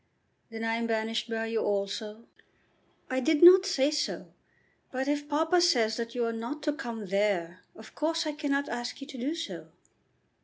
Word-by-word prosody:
"Then 225 0 -6
I 225 0 0
am 230 0 -2
banished 225 0 -1
by 225 0 -2
you 225 0 -1
also?" 210 +2 -3 0.8
"I 260 - -1
did 305 +5 +2
not 370 +2 +9
say 280 -6 +2
so. 295 -1 -3 0.6
But 265 +1 -2
if 290 0 -1
papa 320 +4 +2
says 235 -11 +3
that 230 0 -5
you 240 -1 0
are 230 - -2
not 235 +7 -5
to 295 -1 0
come 235 -8 -6
there, 190 -3 0 0.2
of 220 - -13
course 325 +2 -1
I 305 - -1
cannot 285 -2 -1
ask 240 0 -5
you - - -6
to 275 -2 -10
do 285 +7 -2
so." 335 0 -6
240 Hz, 185 wpm, -29 LUFS, 225-300 Hz, 0.8 s, not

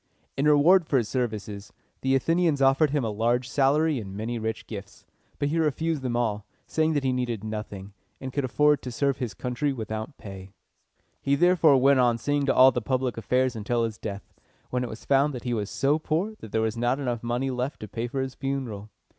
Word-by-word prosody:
In 140 +2 +1
reward 155 +4 +5
for 140 - +2
his 115 -4 0
services, 105 -5 -3 0.3
the 135 0 +2
Athenians 165 +2 +2
offered 135 +3 +4
him 145 -1 0
a 110 - -1
large 120 +4 0
salary 145 +3 +2
and 100 -2 -7
many 115 +2 -3
rich 110 0 -4
gifts; - - -9 0.3
but 145 - 0
he 165 +3 0
refused 160 0 0
them 125 -2 -2
all, 110 -4 -1 0.2
saying 160 0 +1
that 145 -2 0
he 130 -1 +1
needed 120 -4 -2
nothing, 105 -2 -6 0.3
and 130 -1 -6
could 140 - -1
afford 150 +2 +3
to 125 - -6
serve 140 +2 0
his 120 -5 -4
country 125 +3 -2
without 110 +1 -5
pay. 95 -2 -9 0.7
He 140 - +2
therefore 165 -3 +5
went 135 +1 +4
on 120 -2 +3
seeing 145 +3 0
to - - +2
all 130 +1 +8
the 125 - -2
public 130 +1 -1
affairs 125 +2 0
until 115 +2 -1
his 115 -1 -3
death, 100 -1 -7 0.4
when 125 0 0
it 125 - -4
was 110 - -9
found 140 +1 +3
that 125 - -7
he 125 - -2
was 105 -3 -2
so 145 +3 +1
poor 165 +8 -1
that 110 - -10
there 110 - +1
was 110 0 -1
not 120 +3 0
enough 120 -4 -2
money 120 +3 -1
left 125 +2 -3
to 110 - -6
pay 115 +4 -4
for 135 +2 -3
his 130 -1 -4
funeral. 130 -7 -4
125 Hz, 215 wpm, -26 LUFS, 115-140 Hz, 0.7 s, all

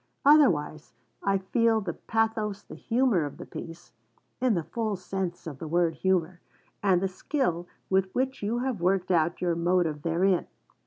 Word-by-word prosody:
Otherwise, 175 - +4 0.3
I 195 0 +2
feel 225 +4 +2
the 190 -5 -4
pathos, 220 -1 -1
the - - -12
humour, 235 -7 +1
of 145 - -6
the - - -8
piece 165 -7 -9 0.5
(in 250 -4 +3
the 170 - -1
full 215 +6 -2
sense 185 -1 -4
of 145 -5 -7
the 160 - -6
word 170 +1 +2
humour) 180 -2 0 0.4
and 190 -3 +3
the - - +2
skill 180 - -2 0.2
with 190 0 +2
which 265 +1 -1
you 215 +3 -1
have 245 -9 -2
worked 185 +1 +1
out 170 0 +1
your 175 -1 +1
motive 170 -3 +1
therein. 175 +3 +1
185 Hz, 165 wpm, -27 LUFS, 170-220 Hz, 0.5 s, Otherwise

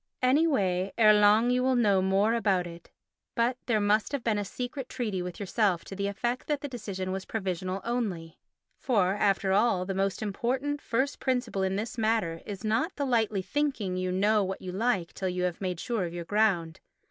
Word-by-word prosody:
Any 285 +6 +4
way 190 - 0
ere 215 -2 +7
long 210 +3 +5
you 250 0 +2
will 260 0 +2
know 205 -6 +3
more 195 +4 +2
about 195 -6 +1
it. 170 0 -11 0.5
But 240 +1 +2
there 225 -3 +2
must 210 +5 +1
have 275 -4 -2
been 215 -3 +1
a - - -1
secret 250 +5 -5
treaty 210 -7 -2
with 180 -1 -6
yourself 200 -3 0
to 195 - -8
the 200 +1 -1
effect 240 +5 -2
that 295 -2 -1
the 290 - -4
decision 200 -7 -5
was 190 0 -3
provisional 190 -2 -3
only. 200 -9 -3 0.4
For, 200 -7 +2
after 200 -2 +1
all, 200 -3 +2
the 195 - -3
most 195 +2 -1
important 255 +8 -2
first 265 +4 -1
principle 250 -6 -1
in 190 0 0
this 225 +4 -4
matter 215 -7 0
is 200 -2 -6
the 215 - -2
not 235 - +1
lightly 225 -7 +1
thinking 265 -9 -1
you 185 0 -1
know 205 +3 +3
what 190 0 -4
you 185 - -5
like 195 -3 0
till 190 - -2
you 180 0 -2
have 180 0 -2
made 180 -3 -2
sure 230 -2 -1
of 170 0 -6
your 170 -1 -5
ground. 185 -5 +1
205 Hz, 205 wpm, -28 LUFS, 185-240 Hz, 0.5 s, ere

